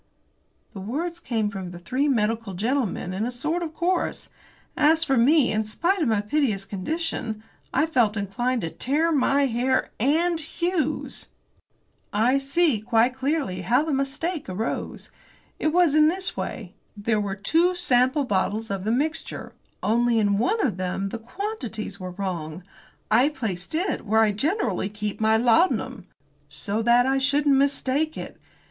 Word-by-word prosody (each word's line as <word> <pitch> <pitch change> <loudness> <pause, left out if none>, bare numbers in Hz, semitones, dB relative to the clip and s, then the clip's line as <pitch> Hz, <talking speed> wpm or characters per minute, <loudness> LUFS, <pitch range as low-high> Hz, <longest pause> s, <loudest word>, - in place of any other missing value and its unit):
'" - - -42
The 200 - -7
words 320 - -3
came 225 -9 -1
from 190 -2 -6
the 175 - -9
three 255 +11 -1
medical 225 -5 0
gentlemen 220 -3 -1
in 195 +3 -2
a 240 - -1
sort 305 +8 -2
of 320 -2 -5
chorus. 355 +1 -1 0.5
As 320 +2 +4
for 270 -5 +1
me, 265 +3 +4
in 220 0 +1
spite 340 - 0
of 305 - +2
my 220 -3 +2
piteous 210 -4 0
condition, 220 - -3 0.3
I 310 - +2
felt 235 -9 +2
inclined 235 +5 -1
to 165 - -3
tear 310 +6 0
my 280 -1 +3
hair 260 +1 0
and 320 +7 +2
Hughes's! 320 -1 -2 0.8
"I 240 +6 +3
see, 280 -2 +2
quite 230 +3 +2
clearly, 265 - -1
how 240 +10 +2
the 315 -2 -2
mistake 275 - -2
arose. 200 +5 -4 0.5
It - - 0
was 335 -1 +3
in 305 0 +6
this 370 +3 -1
way. 195 -5 -5 0.2
There 210 +1 0
were 200 -1 -3
two 330 - +2
sample 260 -4 +2
bottles 210 -1 -1
of 195 -1 -3
the 220 - +1
mixture, 300 +6 -2 0.3
only 235 +1 +2
in 205 -2 +2
one 415 - +1
of 210 -8 -1
them 185 +1 -2
the 230 - -5
quantities 240 - -5
were 185 -1 -5
wrong. 175 -3 -5 0.5
I 245 +6 +5
placed 220 - -5
it 360 +5 -1
where 220 +2 +4
I 215 -1 +4
generally 215 - 0
keep 210 0 -5
my 220 0 +4
laudanum 245 +11 +2 0.4
so 210 +1 -3
that 240 +2 +4
I 270 +1 +2
shouldn't 280 +1 +3
mistake 280 +2 +1
it. - - -8
245 Hz, 160 wpm, -25 LUFS, 210-305 Hz, 0.8 s, in